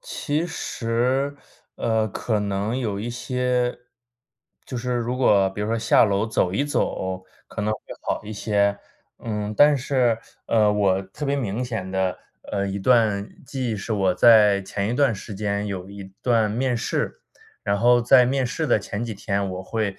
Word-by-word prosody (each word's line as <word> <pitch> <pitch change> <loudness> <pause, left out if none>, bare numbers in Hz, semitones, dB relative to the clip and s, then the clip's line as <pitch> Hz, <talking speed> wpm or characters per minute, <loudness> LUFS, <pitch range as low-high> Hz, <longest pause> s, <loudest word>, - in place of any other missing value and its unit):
其 165 - -2
实， 130 -1 -1 0.4
呃， 110 -1 0
可 110 +2 -2
能 105 +4 -1
有 105 -5 -2
一 120 +3 -4
些 125 0 -1 0.9
就 130 - -6
是 125 +1 -2
如 120 +1 -1
果 100 -6 +4
比 100 +2 -7
如 105 - -1
说 115 - 0
下 115 +1 +4
楼 100 0 +1
走 95 -5 0
一 120 - +1
走 95 -9 -2 0.2
可 - - -6
能 105 +1 0
会 - - -5 0.2
好 - - -2
一 110 - -6
些。 100 -1 +1 0.4
嗯， 105 -2 -3
但 145 0 +6
是， 125 -3 +1 0.3
呃， 105 -2 +3
我 100 -2 +2
特 95 +11 -7
别 140 - +1
明 120 -2 -2
显 110 -6 -4
的， 95 -1 0 0.4
呃， 100 -1 0
一 100 +1 -3
段 110 -2 +2 0.2
记 130 -2 -3
忆 - - -2
是 105 +3 -4
我 95 -3 +2
在 105 -3 +6
前 100 +1 -3
一 - - -1
段 135 -2 +3
时 100 0 -7
间 100 0 -2
有 95 -1 -5
一 100 -1 -9 0.2
段 115 -4 +3
面 125 +3 0
试， 115 - -2 0.4
然 100 0 +1
后 120 +3 +4
在 125 +1 +6
面 130 0 0
试 160 +6 -3
的 120 -6 +3
前 105 +2 -5
几 115 - -4
天 100 -1 -2
我 90 0 -5
会 105 0 -3
110 Hz, 195 characters per minute, -23 LUFS, 100-125 Hz, 0.9 s, 但